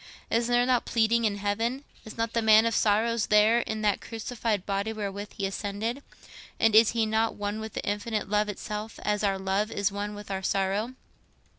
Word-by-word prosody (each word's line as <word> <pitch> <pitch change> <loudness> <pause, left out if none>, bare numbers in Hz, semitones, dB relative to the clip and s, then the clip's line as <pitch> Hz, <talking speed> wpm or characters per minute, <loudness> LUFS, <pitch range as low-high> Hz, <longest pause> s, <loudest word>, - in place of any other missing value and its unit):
Is 230 +1 +2
there 245 0 +3
not 250 -1 +2
pleading 230 0 +2
in 205 -2 0
heaven? 225 +7 -1 0.2
Is 215 - -10
not 230 0 -1
the 230 - +1
Man 220 0 +6
of 230 - +1
Sorrows 220 +2 +2
there 215 +2 +5
in 220 -2 -3
that 205 -2 +1
crucified 225 -3 -3
body 200 +2 -1
wherewith 205 -1 -5
he 200 - -1
ascended? 205 +6 -3 0.6
And 225 -1 +3
is 220 +1 +6
He 230 -1 +1
not 220 +1 0
one 205 +1 -3
with 220 -1 -7
the - - -4
Infinite 210 +1 -2
Love 210 +1 +1
itself—as 210 0 -4
our 195 -1 +1
love 190 +2 -1
is 200 0 0
one 205 +1 -4
with 205 -1 -9
our 190 0 -2
sorrow? 195 +6 -1
215 Hz, 190 wpm, -27 LUFS, 205-225 Hz, 0.6 s, Man